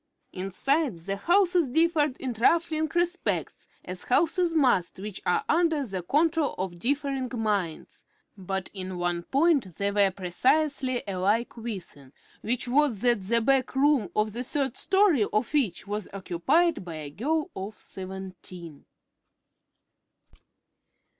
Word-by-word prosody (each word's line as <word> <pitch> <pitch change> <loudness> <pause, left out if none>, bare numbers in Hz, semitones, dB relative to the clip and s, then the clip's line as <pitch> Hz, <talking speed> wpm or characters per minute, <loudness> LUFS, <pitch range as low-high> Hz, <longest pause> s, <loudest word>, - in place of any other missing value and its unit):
Inside, 235 - 0
the 195 +4 -3
houses 350 - +3
differed 310 -1 +2
in 255 -2 -3
trifling 315 +6 +2
respects, 345 +1 -1 0.2
as 185 0 -7
houses 335 +6 +2
must 255 - +2
which 200 0 -6
are 180 - +1
under 325 -4 +2
the 190 -5 -4
control 310 - +1
of 180 -2 -4
differing 275 - -1
minds; 205 -8 -2 0.3
but 190 -1 -4
in 185 -2 -5
one 175 -1 -1
point 270 - +1
they 200 0 0
were 200 -1 +4
precisely 255 - 0
alike 200 +5 0
within, 185 - -8 0.3
which 245 +3 -1
was, 255 -5 +2
that 240 -4 +3
the 230 +5 +1
back 265 +2 +1
room 270 -7 +3
of 215 0 +1
the 240 +2 -3
third 270 -1 -1
story 380 - +3
of 215 +6 -1
each 240 - 0
was 205 -1 -4
occupied 200 - +1
by 170 -2 -7
a 150 -2 -7
girl 310 - -1
of 195 +3 -6
seventeen. 185 -4 -9
235 Hz, 130 wpm, -27 LUFS, 190-295 Hz, 0.3 s, were